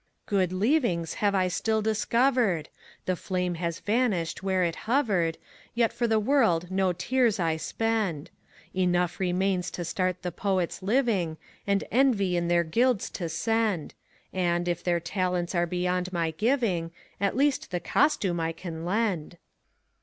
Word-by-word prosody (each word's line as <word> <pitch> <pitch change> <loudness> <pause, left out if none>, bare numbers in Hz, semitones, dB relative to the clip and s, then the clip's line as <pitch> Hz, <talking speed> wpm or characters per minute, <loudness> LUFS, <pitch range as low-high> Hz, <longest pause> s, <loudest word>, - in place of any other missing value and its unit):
Good 190 -3 +1
leavings 185 - +1
have 205 -1 +2
I 185 -1 +2
still 220 +4 0
discovered! 220 - +1 0.4
The 185 - 0
Flame 180 0 -2
has 170 -1 -2
vanished 205 -7 0
where 190 -1 +1
it 170 -1 0
hovered, 200 - +2 0.4
Yet 235 -1 +2
for 240 - 0
the 220 -1 +3
world 210 -8 +2
no 190 -1 +2
tears 230 +4 +1
I 165 -2 +1
spend. 210 -5 -1 0.4
Enough 180 -1 +1
remains 185 0 0
to 175 - -5
start 185 +1 -1
the 180 - -2
Poets 190 0 -1
living, 200 -7 +1 0.3
And 200 0 +2
envy 225 -8 +3
in 170 0 0
their 170 0 +3
guilds 235 +7 +1
to 170 -3 -4
send; 210 0 0 0.4
And, 175 -1 0
if 175 0 -1
their 175 -1 +1
talents 180 0 -1
are 175 -1 +1
beyond 180 +1 -1
my 170 -2 0
giving. 205 - 0 0.3
At 200 +2 0
least 280 0 +1
the 180 - -2
costume 190 - +1
I 165 0 -1
can 165 -1 -7
lend. 180 -4 -1
185 Hz, 150 wpm, -27 LUFS, 175-220 Hz, 0.4 s, the